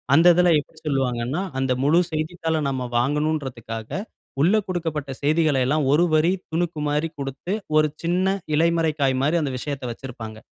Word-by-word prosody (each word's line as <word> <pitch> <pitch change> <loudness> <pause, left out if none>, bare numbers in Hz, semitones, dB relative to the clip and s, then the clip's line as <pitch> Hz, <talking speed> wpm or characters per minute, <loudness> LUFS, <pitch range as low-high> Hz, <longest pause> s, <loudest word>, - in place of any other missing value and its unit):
அந்த 165 +3 +6
இதில 180 -1 +4
எப்பிடி 155 +2 -11
சொல்லுவாங்கன்னா, 130 +2 0 0.2
அந்த 135 -1 0
முழு 155 +5 +4
செய்தித்தாள 160 0 -1
நம்ம 130 -2 -3
வாங்கணுன்றதுக்காக, 130 -5 -2 0.5
உள்ள 180 +8 +4
கொடுக்கப்பட்ட 160 -6 -3
செய்திகள 155 -1 +3
எல்லாம் 145 0 +1
ஒரு 165 +4 +4
வரி 160 +4 +3 0.2
துணுக்குமாரி 160 -2 -1
குடுத்து, 140 +8 -3 0.2
ஒரு 155 0 +4
சின்ன 185 +3 +1 0.2
இலைமறைக் 165 -1 +2
காய்மாரி 135 +5 +2
அந்த 140 - -2
விஷயத்த 140 +1 -5
வச்சிருப்பாங்க. 115 -3 -8
150 Hz, 135 wpm, -23 LUFS, 135-165 Hz, 0.5 s, அந்த